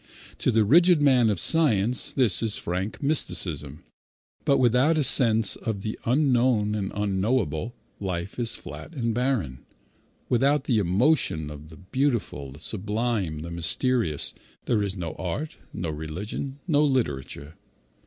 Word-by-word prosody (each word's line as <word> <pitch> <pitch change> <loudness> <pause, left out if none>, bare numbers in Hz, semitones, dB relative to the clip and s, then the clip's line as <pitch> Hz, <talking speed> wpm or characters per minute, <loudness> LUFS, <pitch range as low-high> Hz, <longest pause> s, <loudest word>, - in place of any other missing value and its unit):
To - - 0
the 110 -2 +3
rigid 170 - +5
man 125 -5 +4
of 100 -4 -1
science 125 - +2
this 125 -9 +3
is 110 -2 -2
frank 95 - -4
mysticism; 85 - 0 0.6
but 140 - +3
without 130 +6 +3
a 150 - +2
sense 115 -6 +5
of 110 -4 -4
the 110 - -4
unknown 125 -5 +2
and 100 -2 -3
unknowable, 105 - -1 0.2
life 95 +2 -4
is 115 -2 -1
flat 75 - -10
and 115 -4 -1
barren. 115 - -1 0.7
Without 135 +3 +2
the 120 -6 +1
emotion 95 - +1
of 75 +1 -11
the 80 - -13
beautiful, 100 - -2
the 70 - -13
sublime, 105 -4 -2
the 85 - -7
mysterious, 85 - 0 0.3
there 110 -3 +1
is 100 -1 -3
no 85 -3 -4
art, 95 - -4
no 85 -3 -4
religion, 90 - -6
no 150 -3 +3
literature. 75 - -2
110 Hz, 140 wpm, -25 LUFS, 85-130 Hz, 0.7 s, rigid